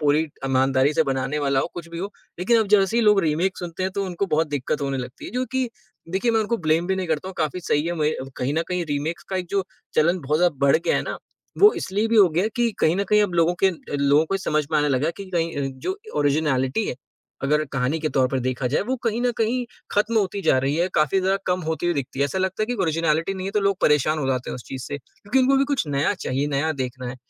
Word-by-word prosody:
पूरी 150 0 +3
एक 160 -2 -4
ईमानदारी 130 +1 +3
से - - +4
बनाने 135 +2 -1
वाला 140 -2 +1
हो, - - -1
कुछ 170 -1 -7
भी 170 0 -7
हो। 195 +3 -4 0.3
लेकिन 225 +6 +3
अब 220 - 0
जैसे 205 +1 +4
ही 235 - +3
लोग 210 -2 +5
रीमेक 165 +4 0
सुनते 175 0 -5
हैं 190 0 -1
तो 200 -1 -1
उनको 185 +2 -2
बहुत 160 -2 +1
दिक्कत 145 +1 -2
होने 135 -1 -1
लगती 125 +1 -7
है, - - -7
जो 250 +3 -1
कि 260 -2 0 0.4
देखिए 215 +5 +1
मैं 225 -1 +2
उनको 230 +2 0
ब्लेम 160 0 +1
भी 190 0 0
नहीं 185 -1 -2
करता 160 +4 -1
हूँ। 190 - -8
काफ़ी 160 +3 -1
सही 150 -2 0
है 175 - -1
मुझे 155 -2 +1
अ, 130 - -5
कहीं 135 +3 -1
न 165 - +1
कहीं 180 -1 -1
रीमेक्स 155 +4 -2
का 190 - -1
एक 180 -1 -3
जो 195 -1 0 0.3
चलन 170 +4 +3
बहुत 150 +1 0
ज़्यादा 175 -2 +3
बढ़ 140 - +6
गया 165 - 0
है - - 0
ना। - - -5 0.4
वो 415 +2 +8
इसलिए 205 +4 -1
भी 230 - +2
हो 200 -3 +7
गया 175 +5 +1
है 215 - +1
कि 240 -1 +2
कहीं 160 +3 +3
न 200 - 0
कहीं 210 0 +5
अब 185 -4 -1
लोगों 170 +1 +3
के 195 - +7
अ, 180 - -7 0.2
लोगों 140 +2 +4
को 195 - -2
ये - - +1
समझ 155 -5 0
में 155 - +4
आने 150 0 +2
लगा 135 +2 +1
है 170 - 0
कि 195 -1 -9
कहीं 165 -2 0
अ, 140 -1 -1
जो 380 - -3 0.2
ओरिजिनैलिटी 145 +3 +1
है, - - -2 0.5
अगर 150 +2 +2
कहानी 135 +4 0
के 155 - 0
तौर 130 -3 +2
पर 135 - -1
देखा 130 +1 -2
जाए, 140 - +1
वो 250 +6 -1
कहीं 230 +1 0
न 245 - +2
कहीं 235 +3 +1 0.3
खत्म 215 +2 +1
होती 200 0 -1
जा - - +4
रही 135 +3 0
है, 175 +2 +1
काफ़ी 155 +5 +3
ज़्यादा 190 +1 +2
कम 180 0 +1
होती 160 +2 -2
हुई 175 - +1
दिखती 140 -2 -4
है। 140 - +3
ऐसा 165 +7 -2
लगता 190 +3 -1
है - - 0
कि 245 - -2
ओरिजिनैलिटी 165 +2 +1
नहीं 190 0 -5
है - - -2
तो 210 - +2
लोग 195 -1 +2
परेशान 150 +1 +3
हो 140 - -1
जाते 130 -1 -1
हैं - - -4
उस 125 - -8
चीज़ 130 -1 -6
से। 145 - -4
क्योंकि 205 - -3
उनको 265 +1 +4
भी 275 - +3
कुछ 245 - 0
नया 140 0 +1
चाहिए, 135 +3 -2
नया 145 +3 0
देखना 130 -2 -5
है। 125 - -6
165 Hz, 285 wpm, -23 LUFS, 145-195 Hz, 0.5 s, वो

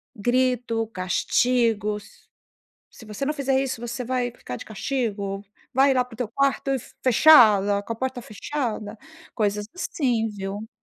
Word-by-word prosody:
grito, 240 0 0
castigos. 210 +2 0 0.7
"Se 225 - -14
você 210 +4 -6
não 300 - 0
fizer 270 -2 +1
isso, 265 -4 -3
você 240 +1 -4
vai 245 0 -1
ficar 125 - -8
de - - -10
castigo, 205 -4 -3 0.3
vai 270 +1 +5
lá 255 -1 +2
para 250 -1 -16
o - - -22
teu 245 - -2
quarto 275 +3 0
e 270 - 0 0.2
fechada, 215 -7 +6
com 230 - -4
a - - -9
porta 260 +2 -3
fechada", 220 -2 -4 0.4
coisas 210 -1 0
assim, 255 -10 -1
viu. 205 +1 -6
230 Hz, 150 wpm, -24 LUFS, 210-260 Hz, 0.7 s, fechada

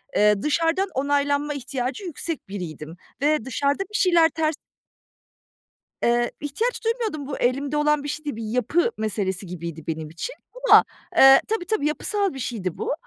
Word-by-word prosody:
Eee, 210 -1 +4
dışarıdan 330 +5 +1
onaylanma 285 +2 +1
ihtiyacı 265 - -4
yüksek 330 - -5
biriydim 165 -5 -7 0.3
ve 300 -4 +2
dışarıda 280 +7 0
bir 405 - -21
şeyler 345 -5 +5
ters 310 0 -1 1.5
Eee, 240 0 +2
ihtiyaç 440 - -2
duymuyordum. 445 - -1
Bu 290 - -4
elimde 275 +4 0
olan 295 -1 +2
bir - - -5
şey 305 +1 -5
değil, 290 -6 -3
bir 225 - -6
yapı 250 - +1
meselesi 200 -3 -2
gibiydi 170 -3 -7
benim 160 -1 -4
için 170 - -6 0.3
ama, - - +9 0.3
ııı, 270 0 +9
tabii, 435 -5 -1
tabii, 380 -7 0
yapısal 395 +4 -1
bir 270 - -7
şeydi 215 -8 -3
bu. - - -1
285 Hz, 155 wpm, -24 LUFS, 220-325 Hz, 1.5 s, ama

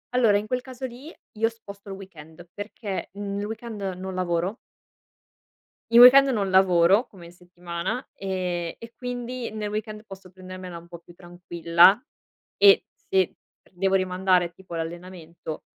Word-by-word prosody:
Allora, 225 -5 +4
in 210 - -3
quel 250 +2 -2
caso 260 0 -8
lì, 260 +6 -9 0.3
io 225 +1 +3
sposto 200 -3 -13
il 195 - -5
weekend, 170 -3 -13
perché 205 -1 -6
nel 200 0 -4
weekend 220 -1 -7
non 190 +1 -6
lavoro. 180 +2 -1 1.3
I 235 - +7
weekend 270 +2 +9
non 205 -6 0
lavoro 190 +3 +4
come 180 -4 -14
in 170 - -12
settimana, 175 +5 -6
ehm, 180 -3 -3
e 230 0 -12
quindi 245 -1 -5
nel 215 -1 -4
weekend 215 0 -5
posso 190 -2 -12
prendermela 185 -1 -9
un 170 0 -13
po' 170 -1 -10
più 175 - -18
tranquilla. 175 +2 +3 0.6
E 200 -1 +6
se 190 -2 0 0.3
pr - - -28
devo 195 +2 +1
rimandare 185 -1 +1
tipo 180 -1 -10
l'allenamento 170 -1 -7
190 Hz, 150 wpm, -25 LUFS, 175-215 Hz, 1.3 s, weekend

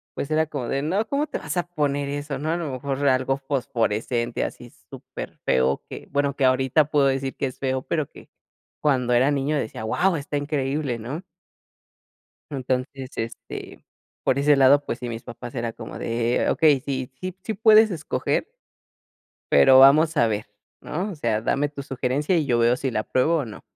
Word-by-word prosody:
pues 140 - -4
era 155 0 +2
como 130 -6 -4
de: 135 +2 -1
“No, 195 +9 0
¿cómo 290 +2 0
te - - -4
vas 150 +4 -5
a 175 - 0
poner 145 -4 -1
eso?", 145 -1 -4
¿no? 155 +2 -3
A 170 - 0
lo 160 -5 -4
mejor 135 +1 -3
era 140 -2 +4
algo 130 +1 0
fosforescente, 120 -3 -1
así - - -7 0.2
super - - -9
feo, 65 +1 +2
que, - - -9
bueno, 140 0 0
que 135 - +1
ahorita 130 +3 +3
puedo 145 -2 +2
decir 135 0 -1
que - - -2
es 130 - -6
feo, 130 -1 -1
pero 155 -4 -2
que - - -15 0.5
cuando 130 -5 +2
era 130 +4 +4
niño 145 +1 0
decía: 110 -3 -4
“Guau, 180 +11 +1
está 145 0 -3
increíble", 140 -3 -1
¿no? 130 +10 -6 1.3
Entonces, 130 0 -3
este, 115 0 -7 0.4
por 130 - +2
ese 145 +1 +4
lado, 140 +2 +5
pues 120 - -4
sí, 120 -1 -5
mis 115 0 -6
papás 120 +1 -9
era 115 -1 -2
como - - -8
de: 115 +1 0
“Okey, 150 -4 +4
sí, 130 -1 -4
sí, 185 0 -5
sí 220 - -2
puedes 220 0 +6
escoger 165 - -1 1.0
pero 130 0 +7
vamos 155 +4 +6
a 115 - +4
ver" 105 -1 -2 0.4
¿no? 185 +7 -3
O 180 - -7
sea, 115 -6 -1
dame 145 +5 0
tu 145 -1 -7
sugerencia 135 +5 0
y 155 - +1
yo 120 -3 +1
veo 120 +1 +4
si 130 0 -3
la 110 -1 -1
pruebo, 160 +6 +2
o, 140 - -2
no. 110 - -10
140 Hz, 190 wpm, -24 LUFS, 125-150 Hz, 1.3 s, pero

